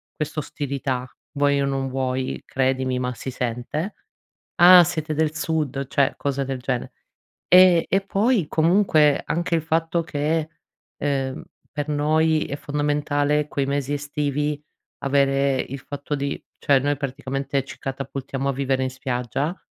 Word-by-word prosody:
questa 155 0 -3
ostilità 135 -3 -3 0.3
vuoi 140 -1 +2
o - - +1
non 135 -1 -1
vuoi. 130 0 -2
Credimi, 130 -1 0
ma 125 0 -2
si 130 - -6
sente: 125 - -3 0.7
"Ah 180 0 +10
siete 155 -1 -2
del 155 0 0
sud," 150 -4 -2
cioè 140 0 +2
cose 140 -1 -1
del 130 -1 -3
gene. 125 -1 -3 0.6
Ehm, 180 -2 +7
e 195 - +2
poi 200 +1 +1
comunque 160 -3 +3
anche 170 +1 0
il 165 - +1
fatto 165 +1 0
che, 155 0 -1 0.5
ehm, 135 -2 -2 0.3
per 145 0 -3
noi 155 +1 +2
è 140 - -4
fondamentale 145 0 0
quei 140 -1 -1
mesi 140 0 -1
estivi 145 0 -2 0.4
avere 140 -1 +2
il 135 +2 -7
fatto 145 +2 -6
di 140 0 -3 0.2
cioè 140 -2 +4
noi 145 +1 0
praticamente 135 0 -2
ci 135 - -11
catapultiamo 135 0 -4
a - - +1
vivere 135 0 0
in 130 - -1
spiaggia, 130 - -2
145 Hz, 145 wpm, -23 LUFS, 135-155 Hz, 0.7 s, Ah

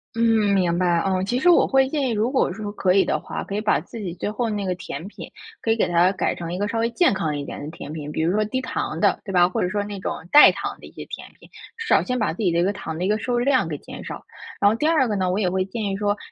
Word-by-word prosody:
嗯， 225 -3 +3
明 180 -3 +2
白。 175 -2 +2
嗯， 190 -1 0
其 245 +5 -1
实 355 - +1
我 345 - +6
会 270 -1 +3
建 275 -3 -1
议， - - -1
如 220 +2 0
果 265 - +2
说 205 +3 -5
可 185 -3 +1
以 195 - +4
的 - - 0
话， - - -6
可 200 - -5
以 210 - -1
把 215 - +2
自 205 +8 -11
己 180 -4 -4
最 180 - -3
后 225 +2 -2
那 205 -2 -2
个 185 -1 -1
甜 180 0 -7
品， 210 - -10 0.3
可 225 - 0
以 - - +3
给 - - +2
它 175 +2 +3
改 200 - -1
成 170 -1 -6
一 - - -3
个 205 - 0
稍 225 +2 -2
微 230 +1 +1
健 350 - +3
康 160 -6 -2
一 145 - -5
点 - - -7
的 150 - -6
甜 155 -2 -9
品， 150 -1 -6
比 - - -4
如 165 +3 +1
说 215 +1 +2
低 260 +5 -2
糖 - - -3
的， - - +2
对 200 - -6
吧， 180 -1 +5
或 180 - -2
者 180 - 0
说 205 +2 -1
那 205 -1 -6
种 - - -2 0.2
代 295 - +9
糖 - - -5
的 - - -11
一 - - -13
些 - - -9
甜 - - -9
品， - - -18 0.3
至 455 -1 -6
少 - - +4
先 250 -1 -2
把 210 -6 0
自 195 - -5
己 180 - +2
的 170 - +1
一 - - +3
个 200 +3 +1
糖 160 -5 -6
的 180 - -2
一 - - +1
个 210 +1 +2
摄 245 - -4
入 240 - +2
量 255 -8 +2
给 150 - -3
减 - - -10
少。 - - -7 0.4
然 205 - +5
后 215 - +1
第 295 - -2
二 315 -5 +3
个 210 - -1
呢， 185 -2 0
我 190 - 0
也 185 -4 +1
会 185 +1 0
建 205 +3 -5
议 195 - -1
说， 205 +1 0
205 Hz, 355 characters per minute, -23 LUFS, 180-230 Hz, 0.4 s, 代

